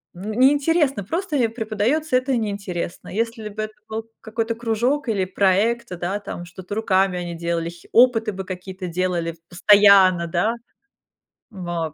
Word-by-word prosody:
н 200 Hz, +5 st, -5 dB
неинтересно, 275 Hz, -, +3 dB
просто 330 Hz, -, -3 dB
им 230 Hz, -3 st, +1 dB
преподаётся, 230 Hz, +7 st, -1 dB
это 255 Hz, -1 st, 0 dB
неинтересно. 200 Hz, -6 st, -4 dB
Если 225 Hz, 0 st, -2 dB
бы 205 Hz, -, -14 dB
это 215 Hz, 0 st, -6 dB, 0.2 s
был 220 Hz, +1 st, -4 dB, 0.2 s
какой-то 225 Hz, +1 st, -3 dB
кружок 240 Hz, +4 st, 0 dB
или 195 Hz, -4 st, +1 dB
проекты, 200 Hz, +1 st, +2 dB
да, 180 Hz, +4 st, -2 dB
там, 175 Hz, -3 st, -7 dB
что-то 185 Hz, +3 st, -8 dB
руками 190 Hz, -4 st, +1 dB
они 170 Hz, -1 st, -5 dB
делали, 170 Hz, 0 st, -2 dB
хи 170 Hz, 0 st, -15 dB
опыты 230 Hz, -3 st, +5 dB
бы 190 Hz, -1 st, -6 dB
какие-то 185 Hz, 0 st, -6 dB
делали 175 Hz, -1 st, -1 dB
в 165 Hz, -, -23 dB
постоянно, 190 Hz, -2 st, +6 dB
да. 175 Hz, +7 st, +1 dB, 1.0 s
Моп 175 Hz, -5 st, -4 dB
205 Hz, 150 wpm, -22 LUFS, 180-230 Hz, 1.0 s, постоянно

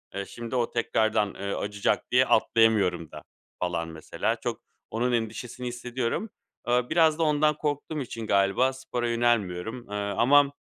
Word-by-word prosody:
Eee, 100 Hz, 0 st, -3 dB
şimdi 120 Hz, +3 st, -6 dB
o 120 Hz, -2 st, 0 dB
tekrardan, 110 Hz, -3 st, +1 dB
eee, 100 Hz, 0 st, -3 dB
acıyacak 100 Hz, 0 st, -1 dB
diye -, -, +5 dB
atlayamıyorum 100 Hz, -8 st, +3 dB
da, 75 Hz, -, -9 dB, 0.4 s
falan, 85 Hz, -2 st, -1 dB
mesela. 80 Hz, -1 st, -2 dB
Çok -, -, -3 dB, 0.3 s
onun 120 Hz, +3 st, 0 dB
endişesini 120 Hz, +2 st, -3 dB
hissediyorum. 125 Hz, -, -3 dB, 0.4 s
Eee, 125 Hz, 0 st, +2 dB
biraz 160 Hz, -1 st, +4 dB
da -, -, +3 dB
ondan 150 Hz, 0 st, +3 dB
korktuğum 150 Hz, +1 st, -2 dB
için 115 Hz, -3 st, -6 dB
galiba 100 Hz, +7 st, +3 dB
spora 125 Hz, -2 st, -3 dB
yönelmiyorum. 115 Hz, -1 st, 0 dB
Eee, 105 Hz, -, -5 dB
ama 120 Hz, +8 st, +3 dB
115 Hz, 145 wpm, -27 LUFS, 100-130 Hz, 0.4 s, diye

